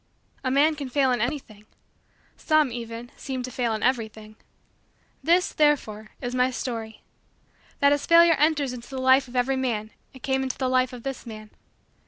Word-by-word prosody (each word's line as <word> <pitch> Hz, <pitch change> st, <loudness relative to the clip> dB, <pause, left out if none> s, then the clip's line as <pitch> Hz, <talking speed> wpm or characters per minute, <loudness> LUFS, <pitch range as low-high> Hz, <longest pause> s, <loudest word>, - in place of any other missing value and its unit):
A 260 Hz, -, 0 dB
man 285 Hz, +4 st, +4 dB
can 280 Hz, -3 st, -6 dB
fail 265 Hz, 0 st, +2 dB
in 245 Hz, -3 st, 0 dB
anything. 235 Hz, -5 st, -4 dB, 0.7 s
Some, 310 Hz, -4 st, +2 dB
even, 235 Hz, 0 st, -7 dB
seem 260 Hz, -2 st, -5 dB
to 255 Hz, -, -6 dB
fail 240 Hz, -1 st, -1 dB
in 215 Hz, -, -5 dB
everything. 220 Hz, -4 st, -2 dB, 0.9 s
This, 350 Hz, +2 st, +2 dB
therefore, 220 Hz, -8 st, +1 dB
is 245 Hz, -1 st, -4 dB
my 255 Hz, 0 st, +2 dB
story: 230 Hz, -3 st, -5 dB, 0.8 s
that 280 Hz, 0 st, +5 dB
as 290 Hz, -, -2 dB
Failure 335 Hz, 0 st, +7 dB
enters 295 Hz, -4 st, +2 dB
into 240 Hz, -1 st, -9 dB
the 265 Hz, -, -6 dB
life 260 Hz, +1 st, +4 dB
of 245 Hz, -, -13 dB
every 260 Hz, +2 st, +1 dB
man 225 Hz, -5 st, -2 dB, 0.2 s
it 260 Hz, -2 st, -16 dB
came 265 Hz, 0 st, 0 dB
into 265 Hz, -1 st, -3 dB
the 260 Hz, -1 st, -1 dB
life 255 Hz, 0 st, +2 dB
of 245 Hz, -2 st, -10 dB
this 270 Hz, -3 st, -6 dB
man. 215 Hz, -1 st, -9 dB
255 Hz, 180 wpm, -25 LUFS, 235-275 Hz, 0.9 s, Failure